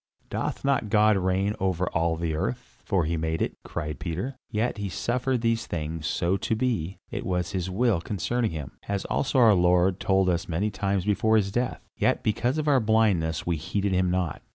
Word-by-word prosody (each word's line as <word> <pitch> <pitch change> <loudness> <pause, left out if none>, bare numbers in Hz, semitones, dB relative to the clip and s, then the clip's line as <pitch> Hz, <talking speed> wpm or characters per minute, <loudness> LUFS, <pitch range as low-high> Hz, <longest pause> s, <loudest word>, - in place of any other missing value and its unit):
"Doth - - -3
not 135 -6 +1
God 105 0 +5
reign 95 +2 +1
over 95 -1 0
all 80 0 +1
the 80 -1 -2
earth, 65 -5 -4
for 90 -5 +1
he 85 +2 -1
made 80 0 -1
it?" - - -1
cried 75 -4 -5
Peter. 95 +11 -3
"Yet 110 +1 -1
he 100 -1 -3
suffered 120 +7 -1
these 115 0 0
things 80 -1 -3
so 90 +3 +1
to 110 - -1
be; 110 -7 -1
it - - -3
was 90 -2 -1
his 95 -1 -2
will 105 -2 +1
concerning 110 +6 -1
him, 75 -5 -6 0.2
as 100 -1 -2
also 135 - 0
our 115 -4 +7
Lord 90 +1 +3
told 95 -1 +2
us 85 -1 0
many 95 +6 0
times 100 -2 -1
before 110 +2 +2
his 100 -2 +2
death, 120 +3 -2
yet - - +1
because 120 +6 0
of 155 -1 -1
our 140 -3 +5
blindness 105 -9 +2
we 85 -2 0
heeded 95 +5 -1
him 90 -1 +2
not. 90 -5 -1
95 Hz, 200 wpm, -26 LUFS, 85-110 Hz, 0.2 s, our